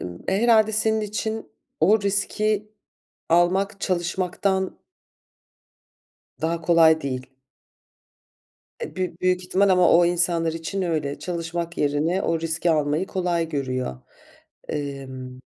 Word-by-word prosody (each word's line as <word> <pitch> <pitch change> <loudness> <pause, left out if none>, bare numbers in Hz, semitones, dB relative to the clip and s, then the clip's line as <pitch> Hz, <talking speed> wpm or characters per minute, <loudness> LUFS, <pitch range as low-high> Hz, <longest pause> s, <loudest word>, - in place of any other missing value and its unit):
Imm, 90 -1 -7
e, - - +2
herhâlde 220 -2 +5
senin 220 +1 +1
için 220 +1 -4 0.3
o 205 +7 +5
riski 210 +1 -1 0.6
almak 185 +4 +2
çalışmaktan 185 +1 -1 1.6
daha 165 +1 -1
kolay 160 -1 +5
değil. 130 -1 -4 1.5
Eee, - - -6
büyük 185 -2 -3
büyük 185 0 +1
ihtimal 195 +2 +2
ama 180 -2 +5
o 175 +1 +6
insanlar 170 -2 +1
için 165 +4 -3
öyle. 155 -5 -2
Çalışmak 170 -1 -4
yerine 150 +6 +1
o 165 -1 0
riski 165 +1 0
almayı 155 +3 +1
kolay 175 -3 -1
görüyor. 130 - -3 0.7
Emm 130 -3 -6
170 Hz, 110 wpm, -24 LUFS, 160-190 Hz, 1.6 s, o